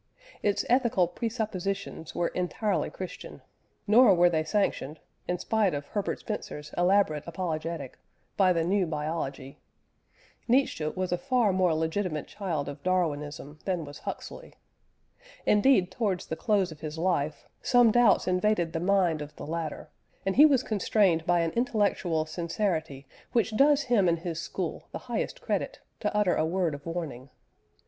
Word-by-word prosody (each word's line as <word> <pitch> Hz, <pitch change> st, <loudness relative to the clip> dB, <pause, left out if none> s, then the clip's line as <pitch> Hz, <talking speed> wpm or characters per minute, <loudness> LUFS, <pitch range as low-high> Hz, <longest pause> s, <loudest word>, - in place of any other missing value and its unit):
Its 205 Hz, -1 st, +1 dB
ethical 235 Hz, -8 st, +3 dB
presuppositions 200 Hz, -4 st, -4 dB
were 170 Hz, -, 0 dB
entirely 190 Hz, +3 st, -1 dB
Christian, 185 Hz, -1 st, -8 dB, 0.4 s
nor 215 Hz, -1 st, +6 dB
were 175 Hz, 0 st, +5 dB
they 160 Hz, -1 st, +1 dB
sanctioned 160 Hz, -5 st, -1 dB, 0.3 s
(in 180 Hz, -, 0 dB
spite 210 Hz, -3 st, +1 dB
of 145 Hz, 0 st, -4 dB
Herbert 205 Hz, -2 st, -2 dB
Spencer's 155 Hz, -8 st, -6 dB
elaborate 175 Hz, -4 st, +2 dB
apologetic) 165 Hz, -5 st, -4 dB, 0.4 s
by 190 Hz, -3 st, +4 dB
the 165 Hz, -2 st, +1 dB
new 185 Hz, +1 st, +1 dB
biology. 150 Hz, -3 st, -4 dB, 0.9 s
Nietzsche 245 Hz, -, +2 dB
was 185 Hz, +3 st, -3 dB
a 180 Hz, -, 0 dB
far 250 Hz, -7 st, +2 dB
more 180 Hz, -3 st, +2 dB
legitimate 160 Hz, 0 st, -1 dB
child 170 Hz, -8 st, -3 dB
of 140 Hz, 0 st, -7 dB
Darwinism 150 Hz, -4 st, -2 dB
than 180 Hz, -4 st, -1 dB
was 145 Hz, 0 st, -10 dB
Huxley. -, -, -7 dB, 0.9 s
Indeed, 210 Hz, -4 st, +4 dB
towards 195 Hz, -4 st, -1 dB
the 160 Hz, -, -4 dB
close 195 Hz, -1 st, +1 dB
of 155 Hz, -, -11 dB
his 155 Hz, 0 st, -6 dB
life, 160 Hz, -4 st, -1 dB
some 245 Hz, -3 st, +5 dB
doubts 235 Hz, -6 st, +4 dB
invaded 180 Hz, -2 st, +1 dB
the 165 Hz, -, -1 dB
mind 180 Hz, -3 st, +2 dB
of 150 Hz, 0 st, -8 dB
the -, -, -8 dB
latter, 160 Hz, 0 st, -5 dB, 0.3 s
and 195 Hz, -, 0 dB
he 295 Hz, +4 st, +9 dB
was 270 Hz, -4 st, +2 dB
constrained 195 Hz, -5 st, +1 dB
by 175 Hz, -1 st, +3 dB
an 165 Hz, -1 st, 0 dB
intellectual 205 Hz, -8 st, 0 dB
sincerity 160 Hz, -3 st, -2 dB, 0.3 s
which 225 Hz, -2 st, +1 dB
does 285 Hz, +4 st, +5 dB
him 230 Hz, -8 st, +3 dB
and 170 Hz, -, +2 dB
his 170 Hz, -2 st, -4 dB
school 170 Hz, -, -4 dB
the -, -, -2 dB
highest -, -, -2 dB
credit, -, -, -2 dB, 0.2 s
to -, -, -2 dB
utter 205 Hz, -4 st, +3 dB
a -, -, +1 dB
word 170 Hz, 0 st, 0 dB
of 145 Hz, +2 st, -8 dB
warning. 155 Hz, -7 st, -5 dB
180 Hz, 155 wpm, -28 LUFS, 160-210 Hz, 0.9 s, he